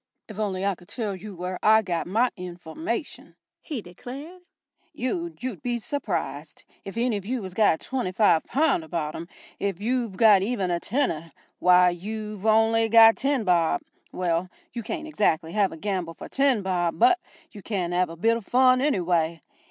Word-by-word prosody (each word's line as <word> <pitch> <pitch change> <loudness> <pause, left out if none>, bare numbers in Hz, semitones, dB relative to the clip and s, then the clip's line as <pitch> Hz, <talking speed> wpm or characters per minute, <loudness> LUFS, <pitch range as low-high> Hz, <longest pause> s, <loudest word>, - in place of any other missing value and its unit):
"If 215 -1 -9
only 195 -3 -1
I 200 - +2
could 175 -1 -16
tell 215 -5 -3
you 195 +2 -9
where 180 +1 -5
I 220 +1 +5
got 175 -4 -2
my 230 +7 +2
information," 180 - -6 0.3
he 275 - -5
declared, 270 - -10 0.5
"you'd 335 +4 -4
you'd 245 -9 -4
be 240 -1 -1
s'prised. 175 - -4 0.2
If 195 +3 -8
any 235 -2 +1
of 195 - -8
you 250 -2 -2
has 185 -1 -7
got 200 -5 +3
twenty 255 -8 -3
five 185 -4 +4
pahnd 275 - +1
abaht 160 -2 -3
him 170 - -7 0.3
if 195 -3 -2
you've 230 -2 -1
got 215 -4 +6
even 195 -3 -1
a 170 - 0
tenner 170 - -1 0.3
why, 180 0 +5
you've 210 +3 -5
only 225 +1 +4
got 225 0 +8
ten 270 -3 0
bob 175 - +2 0.3
well, 175 0 -1 0.2
you 235 - -4
can't 315 +8 -5
exactly 165 - 0
have 200 0 +1
a 165 - -8
gamble 180 -2 -3
for - - -9
ten 270 -6 +2
bob, 175 -3 -1
but 365 0 +5 0.3
you 205 - -11
can 185 -4 -2
'ave 180 -1 +1
a - - -8
bit 230 +6 +2
o' - - -7
fun, 255 +3 +4
anyway. 175 - +1
205 Hz, 180 wpm, -25 LUFS, 175-240 Hz, 0.5 s, got